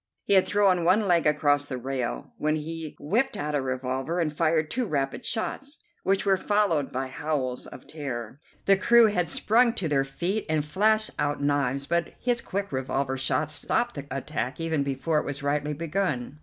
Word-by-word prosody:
He - - +1
had 190 -1 +5
thrown 195 -4 +3
one 195 +5 +3
leg 170 -3 +3
across 145 -1 +3
the 130 - -4
rail, 130 -1 -4
when 155 +1 +1
he 160 0 -5
whipped 220 - 0
out 150 +1 -3
a 145 - +1
revolver 130 +5 -2
and 155 -3 -1
fired 155 -1 +1
two 250 -2 0
rapid 135 -4 -2
shots, 275 +6 -3 0.2
which 195 +1 +1
were 195 -1 +4
followed 195 -9 +1
by 130 +1 -2
howls 130 -2 -3
of - - -11
terror. 130 -5 -6 0.3
The 195 0 +5
crew 235 +4 +6
had 180 -6 +1
sprung 235 +2 +3
to 185 - -1
their 140 -3 +2
feet 175 +10 -2
and 155 -2 +1
flashed 215 +7 +2
out 145 0 0
knives, 140 -1 0
but 170 +2 -1
his 240 -1 0
quick 200 +1 -4
revolver 135 0 -1
shots 145 +3 -1
stopped 240 - 0
the 140 -1 -7
attack 135 0 -3
even 160 -2 0
before 140 +3 0
it - - -4
was 140 0 -5
rightly 145 +1 0
begun. 150 -4 -2
155 Hz, 185 wpm, -26 LUFS, 140-190 Hz, 0.3 s, crew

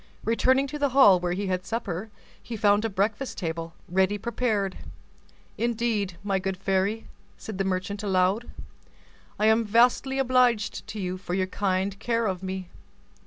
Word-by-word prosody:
Returning 260 +4 +3
to 295 +2 -6
the 285 -1 +2
hall 200 -9 +8
where 175 0 -1
he 200 +3 -2
had 185 -1 -1
supper, 220 -3 -4 0.3
he 230 - -6
found 205 0 +3
a 225 - 0
breakfast 210 +6 -1
table, 165 -2 -4
ready 190 +3 +2
prepared. 215 -3 -1 0.8
"Indeed, 225 -6 -1
my 195 -2 0
good 190 0 -3
fairy," 195 +3 0 0.3
said 210 -3 -7
the - - +2
merchant 190 +2 -2
aloud, 195 +3 +1 0.9
"I 210 - +1
am 220 +1 +4
vastly 245 +5 +3
obliged 250 -5 +2
to 215 - -6
you 185 -1 -3
for 180 -1 -4
your 190 -1 +1
kind 190 +1 -1
care 230 0 0
of 185 -3 -2
me." 190 -1 -5
205 Hz, 160 wpm, -26 LUFS, 185-230 Hz, 0.9 s, hall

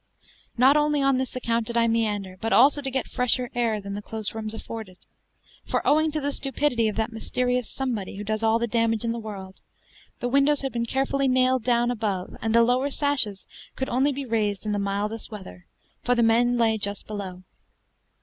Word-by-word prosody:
Not 260 +4 +6
only 295 -1 +2
on 275 -1 +3
this 260 -1 -3
account 230 -2 -1
did 235 - -2
I 230 0 +4
meander, 210 -5 -1
but 225 - -2
also 285 +4 +5
to 270 - -2
get 265 0 -1
fresher 250 0 +1
air 230 -3 0
than 200 0 -6
the 205 - -4
close 215 0 -5
rooms 220 0 -4
afforded; 220 -5 -8 0.7
for - - -2
owing 310 +2 +4
to 310 - 0
the 285 0 -1
stupidity 270 -4 0
of 210 - -2
that 220 +1 -1
mysterious 250 +2 -1
"somebody" 235 -9 -3
who 205 - -5
does 215 +1 -2
all 225 0 +3
the 235 - 0
damage 230 -1 0
in 230 - 0
the 235 - -3
world, 195 -4 -8 0.6
the 245 - -1
windows 280 +3 +3
had 270 -1 -3
been 235 -1 -1
carefully 270 +2 0
nailed 255 -1 +3
down 240 0 +2
above, 205 -6 -3
and 225 0 0
the 235 - +7
lower 250 +4 +2
sashes 265 -9 0 0.3
could 265 - -3
only 265 +4 +2
be 275 0 -4
raised 215 -4 -1
in 210 - -1
the 205 - 0
mildest 205 +3 -2
weather, 190 -4 -10 0.4
for 245 - +2
the 235 - +3
men 240 +2 +3
lay 225 -2 +2
just 200 0 -4
below. 190 -3 -6
230 Hz, 205 wpm, -25 LUFS, 215-255 Hz, 0.7 s, the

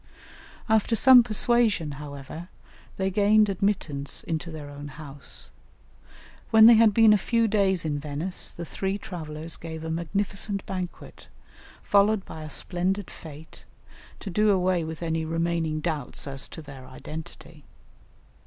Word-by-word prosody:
After 220 +1 +2
some 255 +3 +8
persuasion, 220 -7 +1
however, 145 +4 -8 0.5
they 190 0 0
gained 210 +2 +4
admittance 175 -8 -2
into 165 0 -3
their 155 -3 -8
own 145 0 -8
house. 145 0 -9 1.0
When 220 -1 +8
they 235 - +10
had 225 -1 +6
been 220 0 +6
a 210 - +3
few 230 +1 +1
days 195 -5 +1
in 145 -2 -1
Venice, 150 +5 -3
the 170 - -8
three 195 +4 -3
travellers 160 -4 -6
gave 160 -1 -7
a 160 - -3
magnificent 195 +4 -3
banquet, 185 -2 -7 0.6
followed 205 0 +3
by 160 - -9
a 155 - -7
splendid 185 +4 -2
fête, 155 0 -12 0.6
to 195 - -6
do 210 +4 +3
away 185 -3 +2
with 160 +1 -6
any 160 -1 -1
remaining 165 -1 -1
doubts 155 -5 -3
as 135 -1 -4
to 160 - -9
their 135 -3 -11
identity. 160 +3 -10
170 Hz, 140 wpm, -26 LUFS, 155-205 Hz, 1.0 s, they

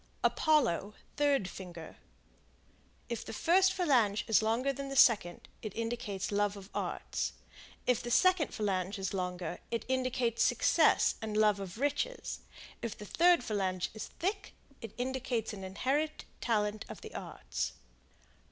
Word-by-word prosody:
Apollo, 215 - +2 0.2
third 285 -9 +2
finger; 175 -4 -9 1.1
if 235 - -4
the - - -7
first 375 - +4
phalange 250 - +2
is 220 -2 +5
longer 235 +5 +1
than 275 +1 -5
the 275 - -4
second, 205 -9 +4
it 215 -3 -6
indicates 225 -4 -3
love 205 0 +1
of 195 0 -12
the - - -2
arts; - - -3 0.5
if 250 -3 +2
the 240 - -5
second 365 +4 +4
phalange 195 -1 -2
is 195 -1 -3
long, 180 -2 -2 0.3
it 230 - -2
indicates 255 -3 0
success - - +4
and 215 -1 -3
love 210 -2 +4
of 195 0 -6
riches; 290 - -1 0.4
if 230 -2 -4
the 210 - -8
third 345 - +4
phalange 190 -5 -1
is 215 -1 -6
thick, 395 +3 -3 0.3
it 225 -3 -8
indicates 245 -3 -2
an 195 -2 -7
inherited 270 +11 -1 0.2
talent 210 -2 0
of - - -8
the - - -9
arts. - - -4
225 Hz, 145 wpm, -32 LUFS, 200-275 Hz, 1.1 s, is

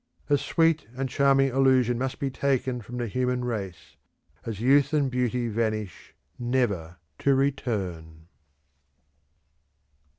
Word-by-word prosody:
A 145 - +6
sweet 165 -6 +1
and 135 0 -1
charming 135 +1 +3
illusion 130 -2 +3
must 130 0 -2
be 135 -1 -2
taken 130 -2 -1
from 120 +3 -8
the 120 - -2
human 125 +2 -1
race, 100 -7 -5 0.5
as 110 -4 -4
youth 140 +4 +3
and 140 -3 +2
beauty 125 -1 0
vanish 110 -3 -3 0.2
never 110 -9 -1 0.2
to 140 -1 +3
return. 95 - -2
125 Hz, 120 wpm, -26 LUFS, 110-135 Hz, 0.5 s, A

